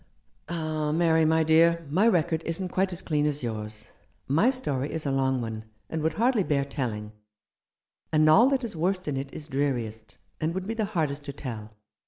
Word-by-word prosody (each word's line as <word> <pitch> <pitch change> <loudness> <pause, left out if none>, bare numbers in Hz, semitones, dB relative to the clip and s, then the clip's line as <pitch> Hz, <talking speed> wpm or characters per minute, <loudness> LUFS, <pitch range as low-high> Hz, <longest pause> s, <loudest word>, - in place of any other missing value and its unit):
"Ah, 155 -3 -2
Mary, 160 0 +3
my 160 +1 +3
dear, 165 +1 +4
my 195 +8 +4
record 170 -5 +2
isn't 180 +3 -2
quite 190 +2 0
as 180 +1 -5
clean 150 -2 +1
as 145 -2 -2
yours. 110 -2 -4 0.4
My 160 - +4
story 145 - -2
is 160 -1 -3
a 140 - 0
long 130 -1 +1
one, 110 -1 -5 0.3
and 160 - -2
would 160 +1 +1
hardly 230 +1 +2
bear 140 -4 +1
telling; 115 -7 -4 1.0
and 155 0 +4
all 225 +12 +7
that 270 -2 0
is 225 -6 -3
worst 180 +2 -1
in 145 - -1
it 135 0 -4
is 150 - -8
dreariest, 125 -7 -2 0.2
and 160 +2 -1
would 190 0 -3
be 220 - -2
the 225 -2 -1
hardest 155 -8 -2
to 140 - -5
tell. 110 -6 -7
155 Hz, 195 wpm, -27 LUFS, 135-175 Hz, 1.0 s, all